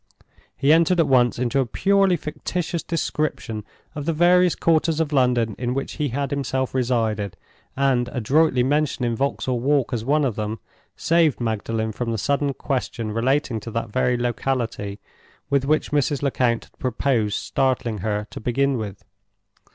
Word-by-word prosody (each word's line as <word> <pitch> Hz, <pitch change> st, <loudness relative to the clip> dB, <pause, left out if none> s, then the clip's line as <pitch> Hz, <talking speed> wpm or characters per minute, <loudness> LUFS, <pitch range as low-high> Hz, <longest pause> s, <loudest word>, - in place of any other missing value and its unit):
He 140 Hz, +2 st, +4 dB
entered 170 Hz, +2 st, +3 dB
at 165 Hz, -, +4 dB
once 125 Hz, -3 st, +3 dB
into 125 Hz, +2 st, 0 dB
a 135 Hz, -, +2 dB
purely 195 Hz, +5 st, +2 dB
fictitious 170 Hz, +2 st, -3 dB
description 150 Hz, -9 st, -2 dB, 0.3 s
of 145 Hz, -1 st, -5 dB
the 165 Hz, -, +2 dB
various 180 Hz, +2 st, +4 dB
quarters 165 Hz, -1 st, +2 dB
of 155 Hz, -2 st, -1 dB
London 125 Hz, -5 st, +2 dB
in 125 Hz, 0 st, -1 dB
which 135 Hz, -, -4 dB
he 150 Hz, -, +2 dB
had 140 Hz, +2 st, -2 dB
himself 135 Hz, -2 st, -1 dB
resided; 110 Hz, -6 st, 0 dB, 0.4 s
and, 130 Hz, -3 st, +2 dB
adroitly 130 Hz, +2 st, +2 dB
mentioning 130 Hz, -4 st, 0 dB
Vauxhall 130 Hz, -1 st, -1 dB
Walk 135 Hz, 0 st, +1 dB
as 115 Hz, -2 st, -2 dB
one 145 Hz, +4 st, +2 dB
of 120 Hz, -6 st, -1 dB
them, 110 Hz, +1 st, -3 dB, 0.4 s
saved 165 Hz, -4 st, +2 dB
Magdalen 110 Hz, -1 st, -2 dB
from 115 Hz, +2 st, -3 dB
the 115 Hz, -, -1 dB
sudden 140 Hz, +4 st, 0 dB
question 120 Hz, -5 st, -3 dB
relating 120 Hz, +1 st, 0 dB
to 115 Hz, -, -8 dB
that 115 Hz, 0 st, -3 dB
very 125 Hz, +2 st, +1 dB
locality 120 Hz, -4 st, -2 dB, 0.5 s
with 140 Hz, -1 st, +2 dB
which 155 Hz, +2 st, +1 dB
Mrs. 145 Hz, -1 st, +1 dB
Lecount 125 Hz, -4 st, +1 dB
had -, -, -23 dB
proposed 125 Hz, -5 st, 0 dB
startling 125 Hz, -5 st, -1 dB
her, 105 Hz, +1 st, -2 dB
to -, -, -7 dB
begin 135 Hz, +4 st, +1 dB
with. 100 Hz, -2 st, -7 dB
130 Hz, 160 wpm, -23 LUFS, 115-145 Hz, 0.5 s, He